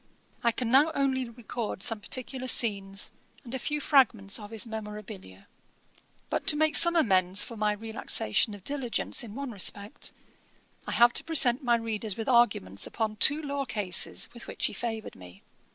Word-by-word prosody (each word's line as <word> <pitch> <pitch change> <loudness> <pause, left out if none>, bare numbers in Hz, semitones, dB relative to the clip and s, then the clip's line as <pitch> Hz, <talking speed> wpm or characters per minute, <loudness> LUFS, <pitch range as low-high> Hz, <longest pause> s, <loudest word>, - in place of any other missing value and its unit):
I 235 - +3
can 235 0 -4
now 290 +5 +5
only 260 -3 0
record 230 -3 -6
some 225 -2 +1
particular 255 +3 -3
scenes, 200 -5 +3 0.3
and 240 - -9
a 265 - -3
few 295 +4 -2
fragments 240 -9 +2
of 205 -1 -10
his 225 0 -2
memorabilia. 210 - -9 0.8
But - - -3
to 295 - +4
make 310 +1 +3
some 340 0 +7
amends 190 - +3
for 235 - -7
my 210 -1 0
relaxation 215 - -1
of 200 - -15
diligence 270 -1 -1
in 220 -2 -10
one 275 -1 -5
respect, 205 0 -1 0.8
I - - -3
have 240 0 +5
to - - 0
present 270 -5 +3
my 240 -1 +3
readers 220 -3 -3
with 225 - -5
arguments 205 - +2
upon 215 -2 -3
two 290 +9 +5
law 280 -1 -3
cases, 205 -7 -1
with 235 - -11
which - - -3
he - - -1
favoured 225 -2 -5
me. 90 +1 -15
230 Hz, 170 wpm, -28 LUFS, 205-260 Hz, 0.8 s, some